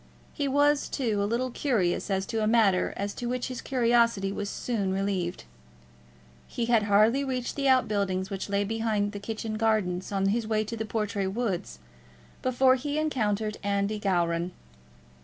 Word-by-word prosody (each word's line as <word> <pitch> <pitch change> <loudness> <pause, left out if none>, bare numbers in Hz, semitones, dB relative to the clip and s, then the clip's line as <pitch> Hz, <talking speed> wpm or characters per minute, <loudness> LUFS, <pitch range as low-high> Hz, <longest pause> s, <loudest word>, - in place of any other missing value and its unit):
He 285 -2 -1
was, 290 +1 +2
too, 220 -6 -1
a 200 - 0
little 250 +3 -1
curious 220 -12 0
as 190 -1 0
to 225 +2 -2
a 215 - +1
matter 215 -5 +3
as 200 0 -3
to 240 - -5
which 250 +1 -2
his 255 - -5
curiosity 235 -5 +2
was 200 0 -4
soon 205 -6 -2
relieved. 190 -2 -2 1.0
He 235 - -2
had 230 -2 +3
hardly 220 +7 +4
reached 255 -2 -3
the 275 -1 0
out 260 -1 +4
buildings 195 -2 -1
which 195 +1 -4
lay 200 0 +1
behind 215 -1 -1
the 205 - -6
kitchen 215 +1 -4
gardens 205 -5 0
on 195 -1 +1
his 225 +2 0
way 215 -1 +1
to 215 +2 -5
the 220 0 -3
Portray 210 -2 -2
woods, 200 -2 -3 0.6
before 255 +1 +4
he 285 +3 -2
encountered 215 -8 -1
Andy 200 +1 -1
Gowran. 175 -3 0
215 Hz, 170 wpm, -27 LUFS, 200-240 Hz, 1.0 s, hardly